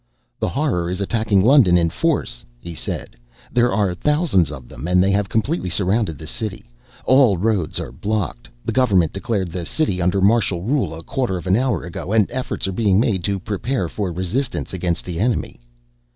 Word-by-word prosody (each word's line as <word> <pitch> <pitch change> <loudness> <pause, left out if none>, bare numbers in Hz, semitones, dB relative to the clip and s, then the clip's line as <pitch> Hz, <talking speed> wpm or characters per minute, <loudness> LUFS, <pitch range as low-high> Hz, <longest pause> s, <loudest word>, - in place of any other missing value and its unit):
"The - - 0
Horror 125 - 0
is 90 +1 -3
attacking 100 -1 +1
London 115 -8 +6
in 85 -1 +2
force," 115 - -1
he 85 +8 -8
said. - - -5 0.4
"There 120 +1 +3
are 100 -4 +1
thousands 150 - +2
of 65 -5 -9
them 80 - -7
and 90 +1 +2
they 100 - +2
have 100 0 +1
completely 115 - 0
surrounded 95 -1 +1
the 80 - -9
city. 110 +5 -5 0.4
All 130 -7 +5
roads 100 -4 0
are - - -5
blocked. 100 - -3 0.2
The - - -1
government 95 -11 +3
declared 100 -2 -2
the 90 0 -4
city 95 - -1
under 90 +3 +2
martial 100 -3 +2
rule 115 - 0
a 80 - -9
quarter 120 -5 -1
of 85 - -8
an 95 +1 +3
hour 120 -6 0
ago 90 +2 -5
and 110 -2 +5
efforts 130 -6 -3
are - - -1
being 100 -1 +2
made 100 -6 +1
to 100 -1 0
prepare 105 +2 -2
for 95 +2 -3
resistance 95 +11 -2
against 85 -2 -2
the 85 -2 -4
enemy." 115 +3 -1
100 Hz, 190 wpm, -21 LUFS, 90-115 Hz, 0.4 s, London